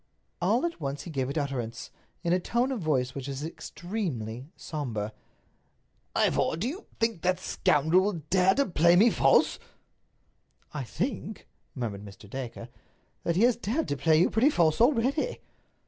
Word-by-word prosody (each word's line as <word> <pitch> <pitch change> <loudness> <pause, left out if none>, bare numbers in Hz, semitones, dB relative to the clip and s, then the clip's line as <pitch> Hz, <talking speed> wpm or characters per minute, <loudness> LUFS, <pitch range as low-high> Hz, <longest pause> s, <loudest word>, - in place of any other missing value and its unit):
All 220 - +2
at 340 - -4
once 140 0 -3
he 170 - -8
gave 135 -3 -1
it 140 - -3
utterance, 135 -6 -3 0.3
in 170 -1 +2
a 180 - +3
tone 240 +8 0
of 255 - -2
voice 130 -5 0
which 135 -1 -6
was 140 +2 -4
extremely 155 - -5
somber: 115 -9 -4 1.0
"Ivor, - - +2
do 200 +8 -1
you 350 +11 -6
think 225 -7 0
that 185 +1 +2
scoundrel 165 0 +2
will 205 - 0 0.2
dare 185 0 +4
to 280 - +3
play 170 -1 +4
me 220 +6 +6
false?" - - +3 1.1
"I 145 -3 -3
think," 215 - -4 0.3
murmured 110 -6 -4
Mr. 105 +1 -12
Dacre, 125 +2 -6 0.5
"that 170 - 0
he 195 - +3
has 245 -1 +5
dared 240 +8 -2
to 145 - 0
play 155 +2 +3
you 175 - +3
pretty 235 +6 +4
false 165 - +2
already." 275 - +2
170 Hz, 165 wpm, -28 LUFS, 135-225 Hz, 1.1 s, me